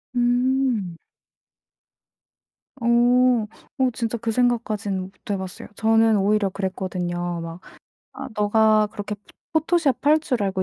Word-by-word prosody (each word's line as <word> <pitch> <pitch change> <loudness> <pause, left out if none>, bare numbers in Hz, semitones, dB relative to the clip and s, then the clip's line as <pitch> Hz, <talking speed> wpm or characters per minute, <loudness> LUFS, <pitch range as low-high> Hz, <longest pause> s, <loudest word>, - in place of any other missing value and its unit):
음. 245 -6 +1 1.8
어. 235 - -2 0.9
어 260 -1 +3
진짜 230 0 -2
그 225 0 -2
생각까지는 220 -5 0
못 185 +1 -8 0.2
해 200 - 0
봤어요. 190 -1 -7
저는 225 0 +3
오히려 200 0 +2
그랬거든요. 180 -2 -3
막 165 +1 -7 0.5
"아 - - -7
너가 215 0 +3
그렇게 205 0 -5
포 205 - -21 0.4
포토샵 320 -4 +1
할 305 +1 +5
줄 250 -8 -1
알고 190 -1 -1
215 Hz, 230 characters per minute, -23 LUFS, 190-240 Hz, 1.8 s, 할